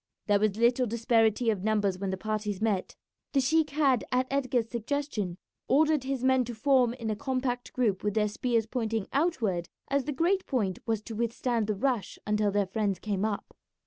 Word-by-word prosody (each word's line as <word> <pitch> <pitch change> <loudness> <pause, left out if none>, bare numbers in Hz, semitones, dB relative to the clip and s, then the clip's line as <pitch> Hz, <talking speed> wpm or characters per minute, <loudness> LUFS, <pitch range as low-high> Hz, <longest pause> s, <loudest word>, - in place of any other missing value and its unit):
There 205 -1 +3
was 210 -1 +1
little 240 +2 +3
disparity 225 0 +2
of 195 -4 -3
numbers 205 -3 +1
when 195 0 -2
the 190 - -2
parties 210 -1 -3
met. 215 -4 -1 0.4
The 275 - +4
sheik 305 +4 +2
had, 275 -4 +2
at 255 +1 +2
Edgar's 255 -4 +1
suggestion, 230 -6 -3 0.3
ordered 300 0 +3
his 270 -2 -2
men 260 -1 +4
to 240 0 -6
form 250 -1 +3
in 230 -3 -3
a - - -1
compact 255 0 -2
group 220 -7 0
with 210 0 -1
their 215 -1 +3
spears 230 +1 0
pointing 225 -3 -2
outward, 230 - 0 0.2
as 280 -1 +1
the 300 - -2
great 350 +7 +1
point 205 - -1
was 220 -2 0
to 225 - -7
withstand 235 0 -1
the 215 - 0
rush 245 -1 -1
until 210 0 +1
their 200 0 +1
friends 200 0 -1
came 200 0 -2
up. 215 -2 -3
230 Hz, 190 wpm, -29 LUFS, 210-260 Hz, 0.4 s, The